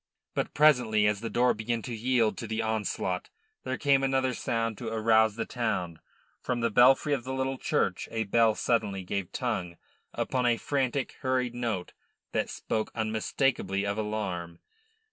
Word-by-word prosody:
But - - -2
presently, 125 -8 +4
as 105 -1 +2
the 115 +1 -4
door 125 +1 +3
began 115 0 -2
to 125 - -5
yield 115 -1 +1
to 115 - -5
the 110 +1 -2
onslaught, 110 -2 -2 0.3
there 130 0 -2
came 140 -2 +3
another 135 -1 +1
sound 115 -1 -1
to 120 - -5
arouse 110 -1 +3
the 115 - -2
town. 90 -9 -2 0.4
From 125 -1 -2
the 115 -1 +1
belfry 135 +6 +5
of 135 -4 -1
the 130 +1 -4
little 130 0 -2
church - - 0
a 110 0 -1
bell 110 +1 +3
suddenly 105 -5 0
gave 95 0 -3
tongue 85 -1 -3 0.3
upon 125 -1 0
a 120 -1 +3
frantic, 135 -1 -1
hurried 130 -2 0
note 115 -7 -3 0.4
that - - -1
spoke 110 -1 -2
unmistakably 110 -1 0
of 100 +1 -1
alarm. 95 -6 -3
115 Hz, 165 wpm, -28 LUFS, 110-125 Hz, 0.4 s, belfry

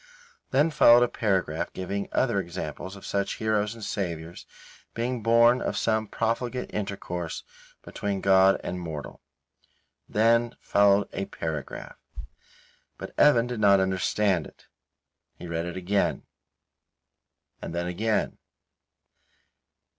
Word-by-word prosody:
Then 145 +5 +2
followed 120 -5 +7
a - - +3
paragraph 95 -9 -1
giving 100 +2 -4
other 120 -6 +1
examples 90 0 -6
of 100 - -12
such 100 -1 -1
heroes 110 0 0
and 115 - -10
Saviours 85 -5 -5 0.5
being 120 +1 -2
born 115 +2 +5
of - - -2
some 110 -1 0
profligate 120 +3 -2
intercourse 95 -4 -4 0.4
between 100 -1 -3
God 95 0 +4
and 90 - -4
mortal. 80 -4 -7 0.9
Then 115 +2 +2
followed 100 0 +3
a 100 - -3
paragraph 80 -6 -6 1.0
but - - -8
Evan 120 -6 +5
did 125 -2 -5
not 100 -2 +5
understand 95 -1 +1
it. - - -20 0.7
He - - -10
read 85 0 -3
it 85 - -6
again 95 +2 0 1.4
and 85 - -6
then 85 0 -1
again. 105 +5 -1
100 Hz, 115 wpm, -26 LUFS, 90-115 Hz, 1.4 s, followed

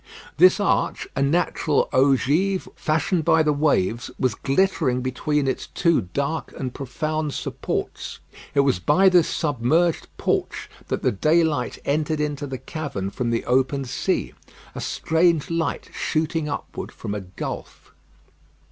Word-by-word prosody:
This 185 +4 +6
arch, 205 - 0
a - - 0
natural 155 0 +1
ogive, 145 +8 +2
fashioned 160 +2 0
by 160 +1 +4
the 150 -1 +2
waves, 125 -7 +1
was 130 -4 +1
glittering 135 - +1
between 135 +3 -1
its 130 - -2
two 170 -6 +2
dark 140 +3 -2
and 130 -2 -4
profound 155 +3 -3
supports. - - -4 0.4
It 140 - +6
was 135 -10 +2
by 190 - +4
this 175 -3 +4
submerged 155 +4 +1
porch - - -1 0.2
that - - -2
the - - +3
daylight 155 - +1
entered 155 +2 0
into 145 -1 -2
the 135 -1 -4
cavern 130 -8 -5
from 120 +2 -2
the 115 0 -1
open 135 +2 +1
sea. 120 - -1 0.4
A - - -6
strange 165 -1 +1
light 165 0 -2
shooting 155 0 -1
upward 145 - -5
from 100 - -6
a 105 - -3
gulf. 95 0 -7
150 Hz, 140 wpm, -23 LUFS, 130-160 Hz, 0.4 s, This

